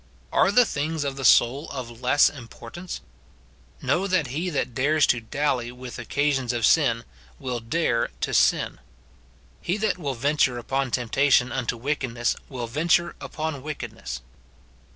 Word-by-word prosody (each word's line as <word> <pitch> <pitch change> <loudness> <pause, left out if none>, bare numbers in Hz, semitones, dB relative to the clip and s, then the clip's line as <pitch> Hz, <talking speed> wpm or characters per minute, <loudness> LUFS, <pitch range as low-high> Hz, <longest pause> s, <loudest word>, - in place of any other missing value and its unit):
Are 195 - +4
the 245 +4 +6
things 155 -2 -2
of 140 -1 -2
the 135 - -6
soul 130 +4 +4
of 120 -3 -7
less 130 +3 +5
importance? 135 +6 -8 0.8
Know 190 +3 +1
that 185 -5 +2
he 170 +5 -1
that 140 -6 -2
dares 150 +5 +3
to 120 - +2
dally 125 0 -1
with 125 0 -9
occasions 135 0 0
of 115 -2 +1
sin 115 -7 +3 0.3
will 125 -2 -3
dare 115 -1 0
to - - -1
sin. - - +2 0.8
He 180 - -1
that 210 -3 0
will 140 -5 -2
venture 135 0 +2
upon 135 +2 -1
temptation 125 +1 +2
unto 120 -2 -2
wickedness 125 -2 -1
will 125 -3 -4
venture 170 +7 +1
upon 155 -3 -4
wickedness. 70 - -6
135 Hz, 145 wpm, -25 LUFS, 120-155 Hz, 0.8 s, the